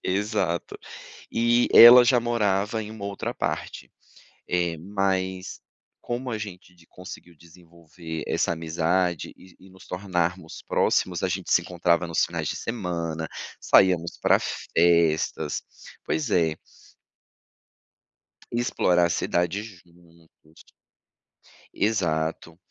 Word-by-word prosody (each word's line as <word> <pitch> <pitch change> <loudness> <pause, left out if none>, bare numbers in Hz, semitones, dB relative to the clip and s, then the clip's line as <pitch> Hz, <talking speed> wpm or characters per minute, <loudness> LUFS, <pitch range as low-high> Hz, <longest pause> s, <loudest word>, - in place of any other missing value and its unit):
Exato, 95 -3 -2 0.6
e 120 +1 +2
ela 120 +1 +11
já 120 0 +4
morava 110 -2 0
em 105 - -9
uma 105 -2 -8
outra 100 0 -4
parte, - - -4 0.6
eh, 85 -2 -1
mas, 95 0 -2 0.4
como 125 +2 -4
a 110 - -2
gente 90 -3 -9
de 85 - -22
conseguiu 90 -1 -11
desenvolver 85 -1 -10
essa - - 0
amizade 85 +1 -1
e 95 -1 -18
e 95 - -17
nos 95 0 -17
tornarmos 90 -2 -3
próximos, 90 -2 +1
a - - +2
gente 95 0 -4
se 85 - +5
encontrava 85 -1 0
nos 85 - +1
finais - - -4
de - - -3
semana, 85 -7 -4 0.3
saíamos 90 -3 +3
pra - - +4
festas, 85 -2 +1 0.4
pois 150 -7 -2
é. 80 -4 +2 2.0
Explorar 90 -7 +1
a - - 0
cidade 85 +3 -1
juntos. 85 -5 -18 1.1
Exato, 80 -6 -1
90 Hz, 110 wpm, -25 LUFS, 85-100 Hz, 2.0 s, ela